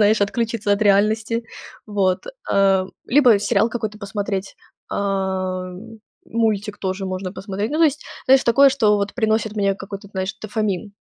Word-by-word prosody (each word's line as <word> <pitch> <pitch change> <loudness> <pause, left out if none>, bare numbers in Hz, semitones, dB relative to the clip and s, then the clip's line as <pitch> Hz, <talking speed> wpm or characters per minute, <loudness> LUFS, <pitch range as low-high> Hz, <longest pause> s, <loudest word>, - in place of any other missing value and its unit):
знаешь, 210 +1 +4
отключиться 220 0 0
от 200 +1 +1
реальности. 215 +3 +2 0.4
Вот. 195 - 0 0.3
А, 195 -1 +3 0.2
либо 245 -5 +5
сериал 210 +2 +1
какой-то 215 -3 -4
посмотреть. 200 -1 -4 0.3
Ам, 190 0 -2 0.4
мультик 215 -2 -1
тоже 190 0 -3
можно 185 0 -4
посмотреть. 200 +2 -4
Ну, 305 - -1
то 330 - +6
есть, 300 -1 0 0.2
знаешь, 265 0 +5
такое, 275 +4 +6
что, 220 -6 +3
вот, 200 0 -2
приносит 220 -2 0
мне 200 -1 +2
какой-то, 200 +1 -9
знаешь, 190 -1 -3
дофамин. 210 -2 -2
205 Hz, 145 wpm, -21 LUFS, 195-225 Hz, 0.4 s, то